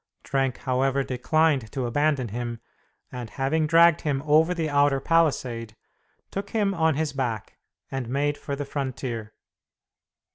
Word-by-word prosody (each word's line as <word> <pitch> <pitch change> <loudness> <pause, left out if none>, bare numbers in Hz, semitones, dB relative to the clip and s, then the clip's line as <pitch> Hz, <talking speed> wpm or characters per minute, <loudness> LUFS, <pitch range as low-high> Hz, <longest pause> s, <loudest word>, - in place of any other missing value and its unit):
Trenck, 135 -2 0
however, 135 +1 0
declined 135 -1 +1
to 130 -3 -2
abandon 140 0 +1
him, 120 +1 -4 0.5
and 125 -3 -6
having 150 +6 0
dragged 165 +1 +5
him 140 -3 -1
over 155 +3 +4
the 165 -3 -1
outer 145 -1 +3
palisade, 130 -8 0 0.6
took 195 - -4
him 205 -3 +1
on 160 -4 +2
his 155 -1 -1
back, 120 -6 -3 0.3
and 135 -3 -3
made 145 +3 0
for 140 - -5
the 145 0 -4
frontier. 125 -6 -4
140 Hz, 140 wpm, -25 LUFS, 125-155 Hz, 0.6 s, dragged